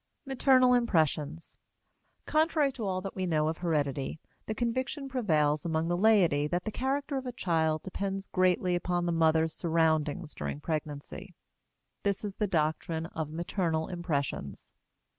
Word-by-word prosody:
MATERNAL 260 -1 +4
IMPRESSIONS. 160 - 0 0.7
Contrary 310 -2 +2
to 230 -6 -4
all 185 -1 -1
that 195 0 -6
we 185 -1 -1
know 155 -2 +2
of 160 - -4
heredity, 145 -4 -1 0.3
the 220 - -2
conviction 260 +5 -2
prevails 155 - +1
among 165 0 -1
the 175 - +2
laity 175 -8 +4
that 175 +3 -1
the 215 - -3
character 275 +4 -1
of 260 -1 -4
a - - -2
child 160 -8 0
depends 195 +1 -3
greatly 185 -1 +2
upon 175 0 0
the 175 - +1
mother's 160 -1 +3
surroundings 160 -1 0
during - - -4
pregnancy: 150 -2 -5 0.7
this 200 +1 -1
is 200 - -4
the 210 - +1
doctrine 160 -1 -1
of 160 -2 -4
maternal 165 0 -1
impressions. 150 - -3
175 Hz, 145 wpm, -30 LUFS, 160-215 Hz, 0.7 s, MATERNAL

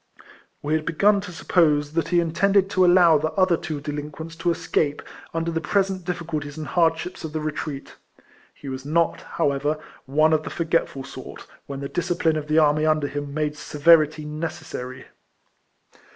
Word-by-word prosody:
We 150 +1 -1
had 155 0 +1
begun 200 +6 +3
to 200 -2 -8
suppose 150 -4 +2
that 165 -1 0
he 175 +1 +3
intended 195 +4 +2
to 185 - +3
allow 175 -3 +6
the 155 +2 -1
other 185 -3 +3
two 160 -3 -5
delinquents 150 +2 -6
to 175 - 0
escape, 150 -3 0 0.3
under 165 0 -2
the 165 0 -2
present 190 +1 0
difficulties 160 -5 -4
and 155 - -5
hardships 165 +2 0
of 155 -2 -6
the 155 - -1
retreat. 150 -2 -5 0.5
He 140 - -13
was 130 0 -5
not, 165 +4 +1
how 160 -4 0
ever, 145 +2 -1 0.3
one 155 +3 +3
of 155 - +3
the - - -6
forgetful 165 -5 -1
sort, - - -10 0.2
when 140 -1 -6
the 140 - -3
discipline 170 0 0
of 150 -1 -3
the 155 +1 +1
army 155 -1 +4
under 155 -1 +2
him 145 0 -4
made 150 0 -2
severity 155 0 +3
necessary. 150 -4 -6
155 Hz, 170 wpm, -23 LUFS, 150-170 Hz, 0.5 s, allow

